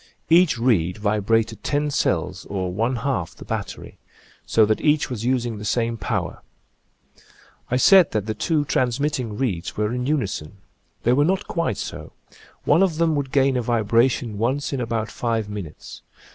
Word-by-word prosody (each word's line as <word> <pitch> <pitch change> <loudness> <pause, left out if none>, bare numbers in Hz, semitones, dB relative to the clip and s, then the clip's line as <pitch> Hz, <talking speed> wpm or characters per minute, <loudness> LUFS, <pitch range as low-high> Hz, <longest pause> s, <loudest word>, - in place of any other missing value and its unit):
Each 170 -5 +5
reed 100 -8 +1
vibrated 110 +2 0
ten 145 0 0
cells, - - -1
or 95 -2 -2
one 115 +6 0
half 120 -9 -2
the - - -12
battery, - - -6 0.5
so 110 - +4
that 110 0 0
each 150 -3 +2
was 115 -2 -4
using 120 -4 0
the - - -7
same 115 +2 0
power. - - -3 1.3
I 125 - +1
said 185 +4 +6
that 105 -2 -2
the 110 - -2
two 150 +7 0
transmitting 125 -4 -1
reeds 100 -10 -2
were 105 +2 0
in 125 +1 -2
unison. 100 - -2 0.5
They 120 - +3
were 145 +3 +4
not 190 +5 0
quite 170 - -1
so; - - -7 0.5
one 150 +5 +4
of 180 -5 +2
them 165 -1 +2
would 140 -2 -2
gain 135 -1 +3
a 125 - +1
vibration 115 -1 +1
once 135 +6 -1
in 135 - -1
about 115 -2 -2
five 115 -3 -1
minutes. 100 -7 -8
120 Hz, 165 wpm, -23 LUFS, 110-140 Hz, 1.3 s, said